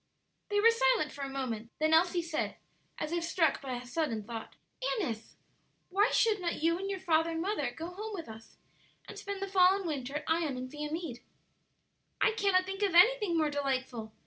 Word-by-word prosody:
They 410 0 +2
were 460 +2 +7
silent 465 -8 +2
for 285 - -9
a 275 - -3
moment; 240 -5 -4
then 310 +1 +2
Elsie 345 +1 +4
said, 330 -2 -2 0.4
as 305 - -3
if 340 0 -1
struck 335 -1 +1
by 260 -3 -4
a 245 0 -7
sudden 245 -4 -2
thought, 225 +1 -7 0.4
"Annis, 230 - -4 0.5
why 405 +5 +3
should 430 -4 +2
not 340 -3 -2
you 335 +1 +2
and 390 +1 -3
your 390 -1 -3
father 330 -2 +2
and 325 0 -2
mother 400 +5 -1
go 330 +2 -7
home 425 +4 -6
with 335 -7 -6
us 225 0 -12 0.5
and - - -8
spend 400 -1 -5
the - - -2
fall 375 -1 +5
and 395 -1 -4
winter 280 -4 -3
at 300 - -2
Ion 320 -5 0
and 255 0 -6
Viamede?" 300 -3 -4 1.0
"I - - +4
cannot 395 -4 +2
think 390 +1 -5
of 390 -4 +1
anything 410 -2 +5
more 310 -2 +2
delightful!" 260 -5 -2
330 Hz, 200 wpm, -31 LUFS, 275-385 Hz, 1.0 s, were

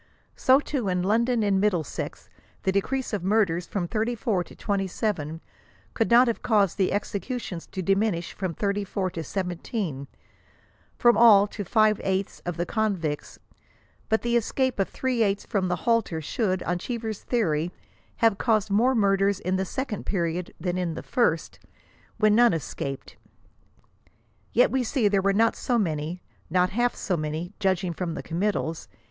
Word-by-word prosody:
So, 260 +1 +5
too, 270 -8 -2
in 180 -1 0
London 230 +3 +2
and 195 -2 +2
Middlesex 180 -8 -2 0.4
the 190 - +2
decrease 250 +7 -1
of 200 -4 -2
murders 185 -4 +1
from 180 -4 -2
34 220 -3 -1
to - - -14
27 195 -5 -2 0.5
could 225 - 0
not 240 +2 +6
have 230 - -1
caused 205 -6 +2
the 190 - +2
executions 205 -2 -4
to 185 - -5
diminish 195 -2 0
from 185 -4 -4
34 200 -2 -1
to 165 - -5
17, 175 - -3 0.5
— - - -35
from 240 0 +5
all 215 -4 +8
to 205 0 -6
five 215 +1 +3
eighths 190 0 -2
of 175 - -3
the 175 - -1
convicts; 185 -10 -2 0.7
but 220 - +1
the 240 0 +1
escape 255 +1 0
of 195 - +1
three 255 -3 -1
eighths 200 -2 +1
from 195 -4 0
the 180 - 0
halter 230 -8 +1
should, 185 +4 -1
on 175 0 -1
Cheever^s 225 0 -4
theory, 170 -8 0 0.4
have 225 -3 +2
caused 215 -4 +1
more 245 +6 +3
murders 200 -2 +2
in 185 0 -1
the 190 - -1
second 255 0 -4
period 175 -2 -1
than 180 0 -2
in 170 -3 -2
the - - -6
first, 165 -10 0 0.6
when 215 -1 +4
none 240 +1 +5
escaped. 140 -3 -5 1.3
Yet 245 - +4
we 265 -1 +1
see 235 -2 +1
there 200 -1 +2
were 200 +1 +2
not 225 +3 +3
so 245 - 0
many; 165 -3 -2
— - - -36
not 180 +2 +2
half 240 +3 +1
so 185 - -1
many, 155 +4 -4
judging 190 -3 0
from 170 -1 -3
the - - -5
committals. 170 -2 -2
200 Hz, 165 wpm, -26 LUFS, 180-225 Hz, 1.3 s, all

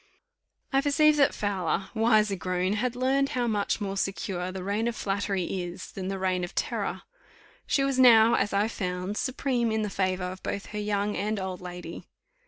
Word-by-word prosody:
I 270 - +4
perceived 300 +1 +4
that 280 - +5
Fowler, 195 -2 -2
wiser 215 -2 +3
grown, 185 +2 -1
had 245 +3 -1
learned 270 +2 +1
how 245 - +1
much 210 -3 0
more 195 -2 -3
secure 190 -2 -2
the 185 -1 -6
reign 205 +4 -1
of 235 - -2
flattery 200 -2 -1
is, 180 0 -5
than 190 -1 -5
the 195 0 -2
reign 185 -1 0
of 175 - -6
terror. - - -2 0.6
She 275 - +2
was 275 -1 0
now, 230 -3 +7
as 205 - +1
I 200 +2 +2
found, 185 -2 -3
supreme 250 -2 0
in 220 0 0
the 210 - -3
favour 185 -1 0
of 185 +1 -5
both 200 - -4
her 210 - -2
young 205 0 -1
and 210 0 -1
old 190 -1 -4
lady. 180 -1 -8
200 Hz, 190 wpm, -27 LUFS, 185-230 Hz, 0.6 s, now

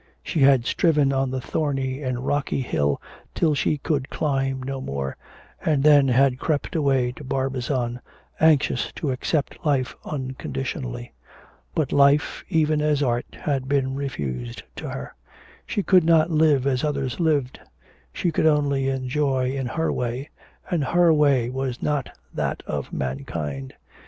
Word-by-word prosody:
She 165 - -2
had 135 -3 +5
striven 145 -2 +2
on 135 0 +1
the 130 0 -2
thorny 135 -1 -2
and 130 -2 -3
rocky 145 -1 0
hill 75 - 0 0.4
till 160 -3 +2
she 150 +1 +1
could 140 -1 -2
climb 135 -3 -1
no 135 0 -4
more, 70 - -3 0.5
and 145 -4 +2
then 145 -2 +6
had 130 0 +3
crept 150 0 -1
away 135 -5 +2
to 135 - -11
Barbizon 130 -2 -2 0.4
anxious 150 -6 +3
to 145 - -2
accept 140 +3 -2
life 140 -4 +1
unconditionally. 65 - -5 0.6
But 155 -4 0
life, 140 +1 +3
even 155 -1 +2
as 150 -1 +2
art, 120 -2 0
had 135 -3 -1
been 135 -2 +1
refused 70 - -4
to - - -5
her. 65 - -6 0.5
She 205 - -1
could 185 -3 +5
not 165 0 +4
live 155 -4 +3
as 130 -2 +1
others 140 -2 -2
lived; 145 -6 +1 0.5
she 170 - -1
could 160 - +2
only 140 -3 +2
enjoy 130 0 0
in 135 -2 -2
her 160 +6 -1
way, 125 +4 -3 0.4
and 170 -5 +1
her 170 +3 +4
way 140 -5 +3
was 130 -1 -3
not 145 -2 -1 0.2
that - - -2
of - - -4
mankind. 70 +1 -4
135 Hz, 145 wpm, -24 LUFS, 125-150 Hz, 0.6 s, then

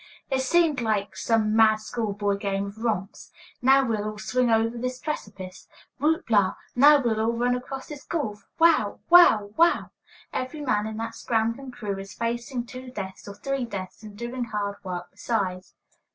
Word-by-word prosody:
It 265 -1 +2
seems 310 -1 +2
like 215 -3 -1
some 220 -2 +1
mad 220 -1 +6
school 215 0 -3
boy 205 0 0
game 200 0 -2
of 200 +2 -9
romps. 215 -5 -3 0.3
Now 270 +2 +5
we'll 220 -4 -1
all 215 - -8
swing 245 +3 0
over 225 +1 +2
this 255 +1 -3
precipice! 200 -10 -6 0.3
Whoop 315 +3 +1
la! 200 -3 +4 0.2
Now 290 +4 +7
we'll 225 -4 0
all 225 +1 +1
run 245 +1 +1
across 265 +2 -6
this 295 -2 -8
gulf! 220 -11 -4
Wow! 330 -1 +4
wow! 225 -13 +7
wow! 335 +1 +3 0.4
Every 260 +4 -4
man 215 -7 0
in 220 0 -6
that 225 0 -4
scrambling 230 +4 -1
crew 210 -6 -5
is 195 0 -9
facing 240 +1 -3
two 255 +1 -9
deaths, 195 -6 -7
or 200 - -8
three 275 +1 -2
deaths, 195 -5 -6
and 210 -2 -11
doing 240 +2 -4
hard 205 -2 -3
work 180 -2 -5
besides. 190 -5 -3
230 Hz, 175 wpm, -26 LUFS, 205-255 Hz, 0.4 s, Now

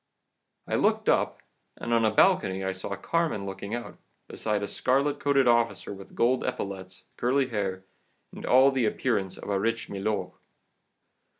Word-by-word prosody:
"I - - -4
looked - - +2
up, - - +1 0.3
and 120 - -2
on 115 -1 +3
a - - +4
balcony 105 - +3
I 95 - 0
saw 95 +1 -4
Carmen 155 - -1
looking 100 +3 -5
out, 120 - -7 0.3
beside 105 -2 -1
a - - -2
scarlet 140 +6 +1
coated 140 -2 +3
officer 115 -4 +2
with 95 -1 -12
gold 125 +2 +2
epaulettes, 95 -1 -5
curly 130 +2 +1
hair, 95 -4 -3 0.5
and - - -9
all 130 +2 +5
the 130 -3 +1
appearance 105 -4 -1
of - - -6
a 100 - +1
rich 115 +2 -1
milord. 100 -1 -2
110 Hz, 160 wpm, -27 LUFS, 95-130 Hz, 0.5 s, all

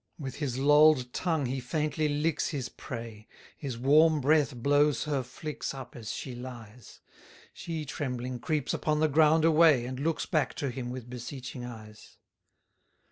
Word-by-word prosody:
132 155 - -9
With 135 -1 -5
his 135 -5 -2
loll'd 145 -3 +5
tongue 160 -6 0
he 130 +2 -2
faintly 150 +3 -1
licks 150 +2 0
his 135 -6 -4
prey; 115 -3 -8 0.3
His 135 -6 -5
warm 150 +5 +5
breath 145 -1 +2
blows 145 +1 +2
her 145 -3 -1
flix 135 +3 -6
up 135 -2 -9
as 110 -3 -6
she 130 - -5
lies; 120 -2 -10 0.5
She 160 -3 -5
trembling 125 -3 -4
creeps 150 0 -1
upon 150 -1 0
the 155 - +4
ground 155 +2 +4
away, 160 -6 +5
And 130 +1 -5
looks 160 +2 -1
back 150 -5 0
to 140 -3 -2
him 120 0 -5
with 125 -1 -7
beseeching 125 +1 -7
eyes. 110 -3 -11
135 Hz, 160 wpm, -29 LUFS, 125-150 Hz, 0.5 s, loll'd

